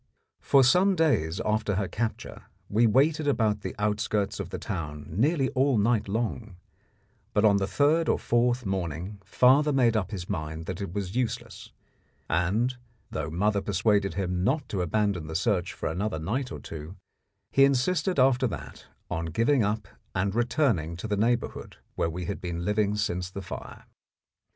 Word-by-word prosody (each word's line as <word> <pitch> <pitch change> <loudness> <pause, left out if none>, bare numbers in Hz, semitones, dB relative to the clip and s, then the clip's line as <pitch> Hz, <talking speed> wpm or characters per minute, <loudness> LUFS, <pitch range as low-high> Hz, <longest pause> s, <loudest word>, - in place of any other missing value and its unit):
For 135 -1 +4
some 180 +9 +4
days 110 - +1
after 105 -1 0
her 100 0 0
capture 110 +5 -4 0.2
we 115 +3 +4
waited 145 +6 +3
about 110 -6 +1
the - - -5
outskirts 105 -1 -1
of 95 -3 -4
the - - -4
town 75 -7 -5
nearly 135 - +1
all 135 -1 +2
night 110 +1 +2
long; 110 -1 -3 0.8
but 105 - +4
on 100 -2 +5
the 95 -1 0
third 155 +6 +2
or - - +3
fourth 120 +1 +1
morning 95 +1 -3
father 130 +9 +4
made 125 -4 +3
up 105 -4 0
his 95 -5 -6
mind 80 +1 -4
that 95 +2 -5
it 100 - -4
was 95 0 -4
useless, 125 -2 -3 0.6
and, 105 +10 +1 0.3
though - - -3
mother 100 +5 +1
persuaded 100 -2 +1
him 90 -2 -1
not 135 +6 0
to 95 - -1
abandon 95 -2 0
the 80 - -6
search 90 -1 +1
for - - -8
another 90 +2 -2
night 120 - -2
or - - -6
two, 80 +3 -8 0.6
he 135 - +5
insisted 150 +7 +2
after 130 -1 +4
that 95 - -8 0.2
on 85 +1 -2
giving 115 - +2
up 105 -1 -1 0.3
and 95 +1 0
returning 115 - +1
to 85 - -5
the 105 - 0
neighbourhood 115 +3 -1 0.2
where 85 - 0
we 90 +2 -5
had 100 - -4
been 85 -1 -4
living 105 0 +1
since 90 -4 -2
the 100 +1 -7
fire. - - -8
105 Hz, 170 wpm, -27 LUFS, 90-125 Hz, 0.8 s, on